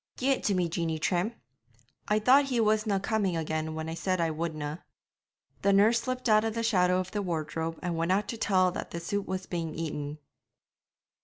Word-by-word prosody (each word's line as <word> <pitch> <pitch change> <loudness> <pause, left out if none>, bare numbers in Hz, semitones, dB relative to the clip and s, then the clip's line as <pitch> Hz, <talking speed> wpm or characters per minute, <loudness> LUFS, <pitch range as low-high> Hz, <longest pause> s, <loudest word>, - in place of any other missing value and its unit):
'Gie 265 +2 +1
it 270 - 0
to 200 - +2
me, 180 -2 +1
Jeanie 165 -1 -2
Trim; 180 +7 0 0.7
I 210 - +3
thought 260 +6 +5
he 255 -3 -1
wasna 215 -2 +2
coming 195 -3 0
again 160 0 -2
when 160 0 -4
I 160 - -3
said 185 +2 -1
I 165 -1 +1
wouldna.' 155 -1 -4 0.8
The 200 - +3
nurse 220 +4 +5
slipped 255 +1 -3
out 215 -1 +5
of 225 0 -2
the 230 - -1
shadow 180 -4 +3
of 185 0 -4
the 205 - -1
wardrobe 165 -2 -3
and 175 -2 -1
went 165 +2 0
out 200 +2 +1
to 230 - -3
tell 185 -4 +3
that - - -5
the 170 - -5
soup 200 +4 -3
was 185 0 -3
being 165 -3 -4
eaten. 150 -2 -4
185 Hz, 205 wpm, -29 LUFS, 165-215 Hz, 0.8 s, thought